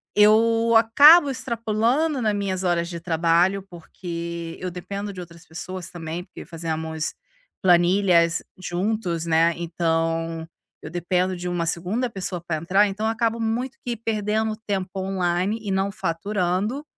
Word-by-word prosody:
Eu 225 +2 +4
acabo 285 +8 +7
extrapolando 240 +4 0
na 215 -2 +1
minhas 195 -2 -2
horas 170 -1 0
de 170 -1 -6
trabalho, 170 +3 +2
porque 170 -1 -6
eu 185 -1 -4
dependo 200 +3 -6
de 185 - -9
outras 170 0 -13
pessoas 185 +2 -6
também, 170 0 -5
porque - - -11
fazemos 160 -1 -3 0.5
planilhas 175 -2 +4 0.2
juntos, 180 -2 -2
né, 165 +1 +3
então, 165 -1 -1 0.3
eu 150 - -8
dependo 180 +2 0
de 180 - -5
uma 175 -1 -1
segunda 200 +10 -1
pessoa 185 -4 -5
pra 160 -2 -1
entrar. 190 +6 +3
Então, 200 +2 -3
acabo 225 0 0
muito 235 +4 -2
que 240 -1 -2
perdendo 220 0 -1
tempo 190 -2 -1
online 190 +2 -1
e 210 - -5
não 195 +1 0
faturando, 195 - -1
185 Hz, 140 wpm, -23 LUFS, 170-215 Hz, 0.5 s, acabo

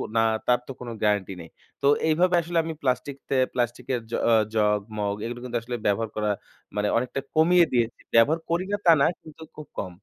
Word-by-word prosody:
না, 115 - +4 0.3
তার 125 0 +4
তো - - -5
কোন 125 -1 -7
গ্যারান্টি 100 -2 +1
নেই। 85 - -11 0.3
তো 140 - +2 0.2
এইভাবে 175 +3 +3
আসলে 170 +1 -3
আমি 160 0 -4
প্লাস্টিক 130 +1 -1
তে, 135 - +1 0.2
প্লাস্টিকের 120 +1 -1
জ - - -7 0.4
জগ, 105 -1 +3 0.2
মগ 100 -1 -1
এগুলো 120 +1 -5
কিন্তু 120 -1 -2
আসলে 120 +1 -5
ব্যবহার 105 +2 +1
করা 105 0 0 0.5
মানে 105 0 0
অনেকটা 125 +3 -2 0.2
কমিয়ে 170 +2 +5
দিয়েছি। 120 -1 0 0.2
ব্যবহার 145 +8 +5
করি 170 +3 0
না, 205 - +1
তা 170 - +8
না, - - +5
কিন্তু 155 0 -14
খুব 150 - -9
কম। 90 - -3
125 Hz, 200 wpm, -25 LUFS, 110-155 Hz, 0.5 s, তা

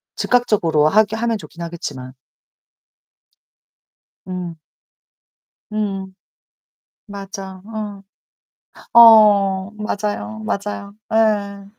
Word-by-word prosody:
즉각적으로 195 -11 +2
하게 215 +5 +3
하면 230 0 -1
좋긴 175 -4 -12
하겠지만. 145 -7 -7 2.1
음. 180 -2 -6 1.1
음음. 195 -3 -3 0.9
맞아, 195 -2 -9
어. 210 -2 -7 0.9
어어어. 210 -4 +6
맞아요, 205 - -4
맞아요. 200 - -4 0.2
예. 205 -3 +1
200 Hz, 160 characters per minute, -19 LUFS, 185-215 Hz, 2.1 s, 어어어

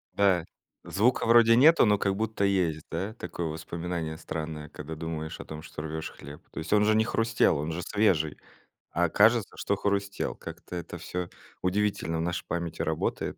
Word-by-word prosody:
Да. 95 -4 +3 0.4
Звука 115 +6 +2
вроде 115 0 +7
нету, 155 +4 +7
но 105 -2 +4
как 100 0 0
будто 110 -1 0
есть, 90 -6 +1
да, 100 +4 -3
такое 85 -7 -4
воспоминание 80 +1 -4
странное, 75 -2 -5
когда 75 +1 -7
думаешь 80 -1 -5
о - - -10
том, 80 0 -7
что 80 - -8
рвёшь 80 0 -5
хлеб. 70 +2 -11
То - - -6
есть 80 - -6
он 105 0 +5
же 110 0 +4
не 110 - +4
хрустел, 115 -6 +2
он 75 +3 -2
же 85 - -3
свежий, 85 -6 +1 0.5
а 85 +1 +2
кажется, 110 +4 +4
что 100 - 0
хрустел. 100 0 -1
Как-то - - -9
это 85 -2 -6
всё 90 -1 -4 0.3
удивительно 95 -3 0
в - - -1
нашей 85 +1 -2
памяти 85 -1 -3
работает. - - -1
90 Hz, 180 wpm, -28 LUFS, 80-105 Hz, 0.5 s, вроде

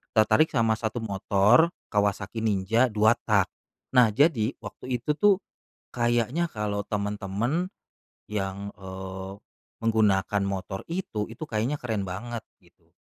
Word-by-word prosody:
tertarik 110 +8 +5
sama 115 -2 +2
satu 115 +1 -2
motor, 100 - +4 0.2
Kawasaki 105 +1 0
Ninja 110 +5 +3
2-tak. 110 +2 +3 0.5
Nah, 115 -4 +6
jadi 135 -5 +3
waktu 130 -1 -5
itu 150 - 0
tuh 205 -2 +4 0.5
kayaknya 120 +7 +1
kalo 105 -1 -2
temen-temen 105 - -1 0.6
yang, 100 -1 -3
eee, 95 0 -7 0.5
menggunakan 105 -3 +2
motor 95 0 -3
itu, 165 - -2
itu 115 - -7
kayaknya 115 +6 0
keren 110 -5 -2
banget 115 +5 -5 0.2
gitu, - - -28
110 Hz, 115 wpm, -27 LUFS, 100-120 Hz, 0.6 s, Nah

